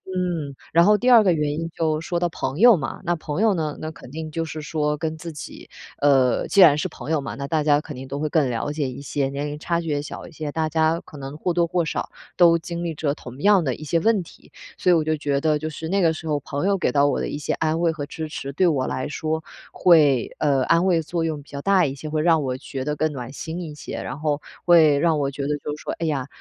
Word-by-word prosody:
嗯， 170 -6 -2 0.2
然 170 +2 +5
后 210 +1 +6
第 250 +4 +1
2 230 -3 +8
个 185 - +4
原 150 -2 0
因 165 - -3
就 155 -2 0
说 170 +2 -2
到 175 0 0
朋 140 0 -4
友 240 -1 +8
嘛， 135 -6 -5
那 175 -1 0
朋 155 +2 -4
友 220 -3 +3
呢， 155 -3 -3
那 155 - -4
肯 130 - -13
定 155 +1 -6
就 165 +1 -3
是 155 0 -6
说 150 -1 -1
跟 160 +1 -4
自 165 +1 -7
己 150 - -9 0.3
呃， 135 -3 +3
既 200 - +4
然 150 -5 +8
是 185 +5 -1
朋 155 - -9
友 160 - +2
嘛， 140 - -5
那 140 0 -5
大 155 +1 0
家 145 0 +3
肯 150 -3 -9
定 130 +1 -8
都 140 +2 -5
会 155 0 -1
更 150 -3 +2
了 125 +4 -2
解 150 -3 -2
一 135 +2 -8
些， 140 -1 -1
年 140 +2 -3
龄 150 0 -5
差 170 +2 -1
距 165 - -8
也 145 -1 0
小 - - -8
一 - - -14
些， 155 -2 -5
大 160 0 -1
家 160 +1 +1
可 150 - -13
能 135 +1 -7
或 180 - -1
多 170 0 +2
或 175 0 0
少 160 - -3 0.3
都 170 -2 +6
经 170 +1 -5
历 170 -2 -2
着 150 -1 -1
同 125 -1 -11
样 200 -3 +5
的 130 -4 0
一 155 - -9
些 165 +2 +1
问 220 -2 +3
题， 170 - -15 0.3
所 180 - +2
以 - - +6
我 160 - +3
就 155 0 0
觉 140 -1 -1
得 155 -1 +2
就 155 +1 -4
是， 160 +1 -6
那 195 +2 +1
个 165 -4 +3
时 160 0 -8
候 150 -1 0
朋 145 +6 -3
友 200 -1 +2
给 - - 0
到 145 0 +3
我 - - 0
的 - - -2
一 - - -4
些 150 - -2
安 160 +1 0
慰 170 -1 +2
和 155 -3 -5
支 155 +1 -6
持， 140 -2 -6
对 180 +6 +3
我 140 -6 +1
来 130 +2 -3
说 160 +1 -3 0.3
会 150 -8 +4
呃， 140 -3 +2
安 170 +2 +3
慰 170 -3 +3
作 165 +1 -3
用 155 -3 -2
比 140 - -20
较 140 - -6
大 190 -5 +4
一 135 - -4
些， 155 +3 -8
会 155 0 -1
让 160 -3 +3
我 130 -1 -2
觉 130 0 -6
得 150 0 -1
更 155 +1 0
暖 130 -2 -7
心 160 +4 -6
一 155 -4 -6
些， 150 - -7
然 130 +4 -6
后 150 -1 0 0.3
会 160 -5 +6
让 165 0 +2
我 140 -1 -1
觉 140 - -6
得 150 0 0
就 150 +1 -5
是 150 - -13
说， - - -4
哎 165 - -4
呀， 140 -5 -1
155 Hz, 305 characters per minute, -23 LUFS, 145-170 Hz, 0.3 s, 2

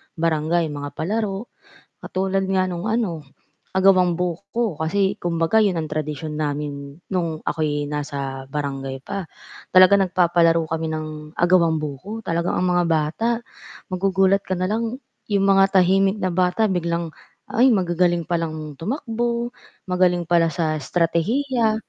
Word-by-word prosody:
barangay. 165 0 0
Mga 145 0 -6
palaro 205 +4 -2 0.5
katulad 190 +1 -1
nga 190 -1 +2
nung 180 +2 -4
ano, 210 -9 -1 0.5
agawang 185 -2 +4
buko 200 +3 -2
kasi 190 +6 0
kumbaga 170 +3 0
'yon 180 -5 +1
ang 155 - -4
tradisyon 150 0 -4
namin 145 0 -4
nung 170 -4 -2
ako'y 145 -2 -1
nasa 140 -2 -4
barangay 135 -2 -4
pa. 195 +5 -5 0.5
Talagang 185 +2 +7
nagpapalaro 170 -3 +2
kami 160 -1 -2
ng 155 0 -3 0.3
agawang 170 -2 +3
buko, 155 +10 -6
talagang 170 -3 -1
ang 185 - +1
mga 175 0 +2
bata 165 +7 0 0.6
magugulat 195 +1 +2
ka 185 - -5
na 185 0 0
lang 230 +4 -2 0.3
yung 200 -1 +2
mga 195 0 +5
tahimik 195 +2 +3
na 185 - +1
bata 185 +4 +2
biglang 170 -2 -1 0.4
ay 245 +4 +5
magagaling 175 -3 +1
palang 155 -3 -3
tumakbo, 235 - -2 0.4
magaling 180 -1 +2
pala 170 -1 +4
sa 155 0 0
estratehiya 220 - +1
175 Hz, 130 wpm, -22 LUFS, 155-195 Hz, 0.6 s, Talagang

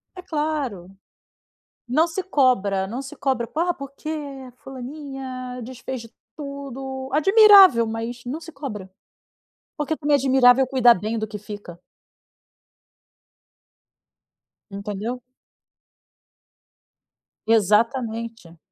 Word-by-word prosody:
É 365 - -8
claro. 295 - -3 1.0
Não 310 +8 +3
se 355 +3 -4
cobra, 225 - +2
não 240 +6 -5
se 275 +2 -9
cobra, 260 -4 -1
ah, 345 +3 +1
porque 275 +2 -9 0.5
fulaninha 260 -1 -7
desfez 255 +1 -7
de 230 0 -13 0.2
tudo, 270 -2 -7
admirável, 390 - +7
mas 230 +2 -5
não 280 +7 -5
se 330 - -10
cobra, 230 -10 -7 0.9
porque 300 +1 -1
também 295 -1 +2
é - - +4
admirável 260 -1 +5
cuidar 245 -2 +5
bem 215 +5 -3
do 220 - -3
que 210 0 -7
fica. 205 -4 -10 2.9
Entendeu? 210 +5 -5 2.3
Exatamente. 225 -3 0
255 Hz, 95 wpm, -23 LUFS, 225-280 Hz, 2.9 s, admirável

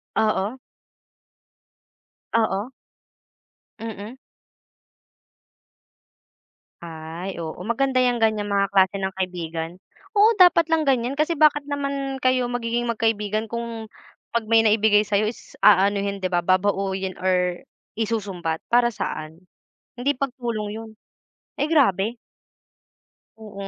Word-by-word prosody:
Oo. 215 +2 +1 1.8
Oo. 220 +1 0 1.1
Mm. 220 +1 -7 2.7
Ay, 165 +3 -7
oo, 160 -1 -5
maganda 255 +3 +1
yang 245 -1 +1
ganyan 215 -2 +1
mga 200 0 +2
klase 190 0 +4
ng 190 0 -2
kaibigan. 175 -2 -4 0.4
Oo, 430 +2 +5
dapat 355 -3 +6
lang 325 -1 +2
ganyan. 260 -1 +1
Kasi 310 +3 +1
bakit 295 -1 +5
naman 275 -1 -3
kayo 255 -1 +2
magiging 240 0 -1
magkaibigan 220 -1 0
kung 230 -1 -5 0.5
pag 235 - +2
may 225 - +7
naibigay 215 -1 +4
sayo 210 0 +1
is - - -16
aanuhin, 200 0 +4
di 185 - -1
ba, 175 -1 0
babauyin 190 0 0
or 180 -1 0 0.3
isusumbat? 195 -7 -2
Para 240 0 +3
saan? 155 -5 -5 0.6
Hindi 275 +4 0
pagtulong 240 -6 -3
yun. 225 0 -8 0.7
Ay, 300 +2 0
grabe. 230 - +2 1.2
Oo. 200 -3 -8
215 Hz, 105 wpm, -23 LUFS, 190-245 Hz, 2.7 s, may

